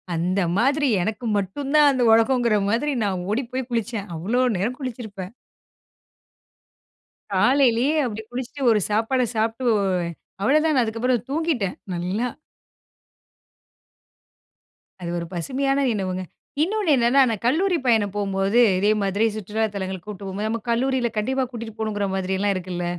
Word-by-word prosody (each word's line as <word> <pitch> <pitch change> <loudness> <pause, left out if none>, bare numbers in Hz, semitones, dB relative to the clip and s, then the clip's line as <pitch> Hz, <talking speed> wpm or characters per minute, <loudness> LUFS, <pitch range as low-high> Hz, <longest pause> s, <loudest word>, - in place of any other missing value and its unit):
அந்த 180 +4 0 0.2
மாதிரி 280 +4 +2 0.2
எனக்கு 220 +3 -3
மட்டும் 270 +9 -3
தான் 295 -1 +7
அந்த 260 -2 -1
உலகங்கிற 235 -1 +3
மாதிரி, 275 +7 +1
நான் 185 -3 -1
ஓடி 255 +5 0
போய் 260 -1 -2
குளிச்சேன். 225 -3 -2
அவ்ளோ 220 +10 0 0.2
நேரம் 235 +7 -2
குளிச்சிருப்பேன். 220 -7 -6 2.0
காலையிலேயே 265 +2 +3
அப்பிடி 220 -3 -3
குளிச்சிட்டு 260 +3 -6
ஒரு 215 - +3
சாப்பாட 225 +5 +1
சாப்பிட்டு, 225 +3 -1 0.8
அவளதான 300 +2 +3
அதுக்கப்பறம் 230 +2 -1
தூங்கிட்டேன், 290 - -1 0.2
நல்லா. 185 +8 -1 2.7
அது 170 - -4
ஒரு 170 - -4
பசுமையான 270 +10 -1
நினவுங்க. 185 -3 -2 0.4
இன்னொன்னு 400 -2 0
என்னன்னா, 245 +3 +4
நான் 220 -1 -3
கல்லூரி 355 +6 +2
பயணம் 210 -4 +2
போம்போது, 195 +3 +2 0.2
இதேமாதிரி 205 +1 +1
சுற்றுலா 215 +2 -1
தலங்களுக்கு 190 0 -5
கூட்டு 200 -1 -7
போம்போது, 205 +3 -3
நம்ம 230 -1 -2
கல்லூரியில 250 -1 +1
கண்டிப்பா 265 +5 0
கூட்டிட்டு 225 -2 -7
போணுங்கிற 205 -2 -1
மாதிரியெல்லாம் 190 +2 0
இருக்குல்ல. 180 -1 -4
225 Hz, 125 wpm, -23 LUFS, 200-260 Hz, 2.7 s, தான்